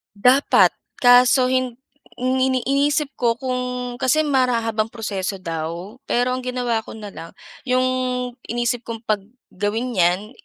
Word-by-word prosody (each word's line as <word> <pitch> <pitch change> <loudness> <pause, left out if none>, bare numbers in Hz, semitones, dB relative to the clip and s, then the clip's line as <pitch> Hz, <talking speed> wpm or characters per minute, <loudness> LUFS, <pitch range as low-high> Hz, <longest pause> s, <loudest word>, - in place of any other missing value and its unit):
Dapat. 250 +7 +5 0.2
Kaso 250 +1 +5
hin 255 -2 0 0.4
ini 260 0 +1
inisip 280 +1 +1
ko 235 -2 +2
kung 255 +1 -3 0.4
kasi 270 +5 +2
mara 255 -5 +2
habang 220 -1 0
proseso 200 -4 -4
daw. 170 +7 -5
Pero 245 +1 +1
ang 255 - -1
ginawa 245 -2 0
ko - - -9
na 210 -2 -8
lang, 165 - -10 0.3
yung 255 0 +2 0.6
inisip 240 0 -2
ko 225 -1 -6
'pag 215 -3 0 0.3
gawin 210 +6 -2
'yan, 180 +5 +2
245 Hz, 140 wpm, -21 LUFS, 215-255 Hz, 0.6 s, Dapat